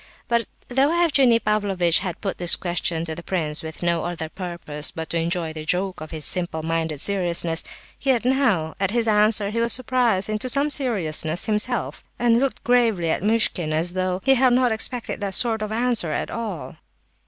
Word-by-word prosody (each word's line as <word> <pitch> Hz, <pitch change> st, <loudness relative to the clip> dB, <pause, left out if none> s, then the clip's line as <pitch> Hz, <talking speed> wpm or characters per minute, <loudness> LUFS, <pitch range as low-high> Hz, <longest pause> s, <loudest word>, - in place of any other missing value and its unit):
But 235 Hz, -1 st, 0 dB, 0.2 s
though 265 Hz, +3 st, +2 dB
Evgenie 290 Hz, -8 st, +4 dB
Pavlovitch 200 Hz, -6 st, +2 dB
had 180 Hz, -3 st, -5 dB
put 195 Hz, -2 st, -3 dB
his 175 Hz, -1 st, +5 dB
questions 170 Hz, -2 st, -2 dB
to 160 Hz, -, -4 dB
the 170 Hz, -, -7 dB
prince 160 Hz, -4 st, -1 dB
with 160 Hz, +1 st, -8 dB
no 170 Hz, -1 st, 0 dB
other 170 Hz, -2 st, -4 dB
purpose 170 Hz, -5 st, -4 dB
but 160 Hz, 0 st, -7 dB
to 170 Hz, -, 0 dB
enjoy 165 Hz, -1 st, -1 dB
the 155 Hz, -1 st, -7 dB
joke 180 Hz, +2 st, -1 dB
of 155 Hz, -, -7 dB
his 155 Hz, -2 st, -3 dB
simple 175 Hz, -3 st, -1 dB
minded 160 Hz, -2 st, -2 dB
seriousness, 170 Hz, -3 st, +1 dB, 0.4 s
yet 260 Hz, -4 st, +1 dB
now, 240 Hz, -, +1 dB
at 195 Hz, -1 st, +1 dB
his 230 Hz, +1 st, +1 dB
answer, 210 Hz, -1 st, +3 dB
he 230 Hz, -, -2 dB
was 235 Hz, 0 st, +2 dB
surprised 245 Hz, -6 st, +1 dB
into 215 Hz, +4 st, -1 dB
some 285 Hz, +3 st, +2 dB
seriousness 175 Hz, -, +1 dB
himself, 220 Hz, +3 st, -1 dB
and 235 Hz, -1 st, +3 dB
looked 270 Hz, 0 st, -2 dB
gravely 225 Hz, -9 st, +2 dB
at -, -, -1 dB
Muishkin 205 Hz, -6 st, +1 dB
as 165 Hz, +3 st, -1 dB
though 185 Hz, 0 st, -2 dB
he 270 Hz, -, +5 dB
had 255 Hz, -1 st, +4 dB
not 250 Hz, -1 st, +3 dB
expected 225 Hz, +1 st, -3 dB
that 195 Hz, -1 st, -1 dB
sort 225 Hz, -3 st, +2 dB
of 215 Hz, 0 st, -4 dB
answer 230 Hz, -7 st, +1 dB
at -, -, -3 dB
all. 215 Hz, -9 st, -6 dB
195 Hz, 190 wpm, -22 LUFS, 170-235 Hz, 0.4 s, his